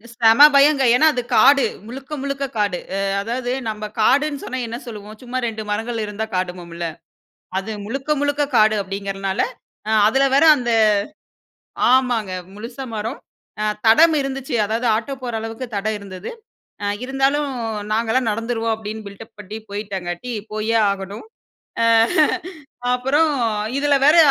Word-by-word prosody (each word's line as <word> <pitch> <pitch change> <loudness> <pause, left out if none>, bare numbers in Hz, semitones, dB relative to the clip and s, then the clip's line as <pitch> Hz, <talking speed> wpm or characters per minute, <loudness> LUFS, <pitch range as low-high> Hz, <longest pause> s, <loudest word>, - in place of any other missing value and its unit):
செம 230 +4 +7
பயங்க. 280 -1 +5
ஏன்னா 315 +5 +5
அது 245 - -1
காடு, 275 -2 +6 0.2
முழுக்க 270 +4 -9
முழுக்க 275 0 -2
காடு. 200 -4 0 0.2
அ - - -1 0.2
அதாவது 245 +3 -3 0.2
நம்ப 215 0 -5 0.2
காடுன்னு 285 +5 +2
சொன்னா, 260 0 -4
என்ன 235 +1 -5
சொல்லுவோம்? 215 -2 -9
சும்மா 250 +1 -4
2 220 -1 -5
மரங்கள் 225 +1 -2
இருந்தா 210 +1 -4
காடும்போம்ல. 175 -2 -4 0.7
அது 205 +3 -3
முழுக்க 270 +6 -5
முழுக்க 290 0 +1
காடு 215 0 +5
அப்படிங்கிறதுனால 195 0 -3 0.5
அ - - 0 0.2
அதில 270 +4 +3
வேற 285 - +5
அந்த 240 -1 -3 1.2
ஆமாங்க. 245 -6 +2 0.2
முழுசா 240 +5 -7
மரம். 225 +7 -4 0.4
அ - - 0 0.2
தடம் 315 +8 +6
இருந்துச்சு. 270 -1 -4
அதாவது 230 +3 -1
ஆட்டோ 235 +5 -3
போற 240 -2 -4
அளவுக்கு 225 +3 -5
தடம் 215 +2 -1
இருந்தது. 195 -1 -8 0.5
"அ - - -1 0.2
இருந்தாலும் 270 +2 0 0.4
நாங்கல்லாம் 230 +2 +1
நடந்துருவோம்" 230 0 -1
அப்படீன்னு 220 0 -7
பில்டப் 200 +3 -12
பண்ணி 210 +2 -7
போயிட்டாங்கட்டி, 200 +2 -5 0.2
போயே 220 +1 0
ஆகணும். 200 - -6 0.6
அ - - +4 1.1
அப்பறம் 290 +5 +2 0.5
இதில 290 0 +2
வேற 310 +3 +6
230 Hz, 135 wpm, -20 LUFS, 210-270 Hz, 1.2 s, செம